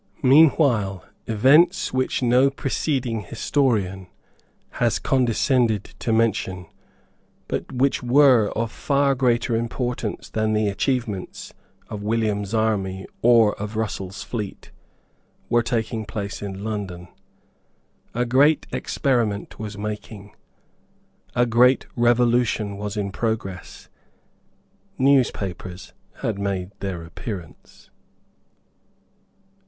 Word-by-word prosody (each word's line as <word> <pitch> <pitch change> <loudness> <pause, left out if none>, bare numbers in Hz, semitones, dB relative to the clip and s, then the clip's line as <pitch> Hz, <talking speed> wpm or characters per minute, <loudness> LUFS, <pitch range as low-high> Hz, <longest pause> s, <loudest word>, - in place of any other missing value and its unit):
Meanwhile 130 - +4 0.2
events 145 - +4
which 130 0 0
no 125 +3 +4
preceding 135 -4 -2
historian 105 -4 -1 0.7
has - - +2
condescended 120 -3 +1
to 115 - -2
mention, 105 -5 0 0.8
but - - -4
which 130 +2 +1
were 125 -3 +5
of 115 0 -1
far 140 -1 +1
greater 120 -2 +1
importance 120 -1 -3
than 110 0 0
the 105 -1 +1
achievements 110 -2 -3 0.3
of 105 - -6
William's 105 -2 -1
army 100 -4 -1 0.2
or 115 -3 +5
of 105 +1 -5
Russell's 100 -3 -4
fleet, 105 -5 -6 0.8
were 120 0 +4
taking 115 -1 -2
place 100 -1 -5
in 100 -1 -6
London. 100 -5 -5 1.1
A 120 +1 +1
great 140 +5 +3
experiment 115 -7 -1
was 105 -1 -6
making. 105 -1 -7 1.0
A 120 0 +4
great 125 +3 +4
revolution 120 -3 +2
was 105 +1 -5
in 100 -1 -2
progress. 100 -4 -4 1.1
Newspapers 105 -8 0 0.3
had 110 -6 -1
made 100 -2 -2
their 95 -4 -4
appearance. 85 0 -9
110 Hz, 95 wpm, -23 LUFS, 100-125 Hz, 1.1 s, were